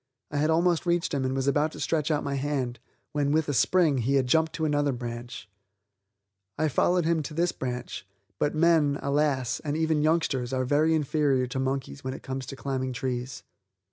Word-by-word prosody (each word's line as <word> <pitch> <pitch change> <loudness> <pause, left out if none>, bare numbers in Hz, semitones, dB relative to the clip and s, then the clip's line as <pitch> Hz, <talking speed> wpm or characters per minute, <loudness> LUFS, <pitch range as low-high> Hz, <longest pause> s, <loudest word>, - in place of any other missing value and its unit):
I 145 - -2
had 150 +2 +2
almost 170 +2 +2
reached 170 -1 +1
him 140 -2 0
and 130 0 -1
was 135 0 -1
about 150 +3 +2
to - - -9
stretch 155 -2 0
out 150 -2 +1
my 140 - -2
hand, 135 -4 -2 0.3
when, 145 -1 0
with 155 0 +2
a 145 - -1
spring, 155 -1 +3
he 130 +4 +1
had 135 -2 +3
jumped 160 +5 +2
to 160 - -2
another 145 -1 +1
branch. 120 -3 -6 1.1
I 155 +1 +1
followed 175 +4 +2
him 165 -1 +2
to 150 +1 -7
this 170 +1 +2
branch, 125 -6 -5 0.3
but 145 - 0
men, 155 -3 +3
alas, 140 -3 +1
and 150 0 -3
even 160 -1 +1
youngsters 150 -6 +1
are 130 0 0
very 155 +4 +3
inferior 145 -3 +1
to 125 +1 -4
monkeys 135 +1 -3
when 130 0 -3
it - - -11
comes 130 -1 -5
to 135 - -6
climbing 130 -1 -3
trees. 125 +1 -4
145 Hz, 200 wpm, -27 LUFS, 130-155 Hz, 1.1 s, spring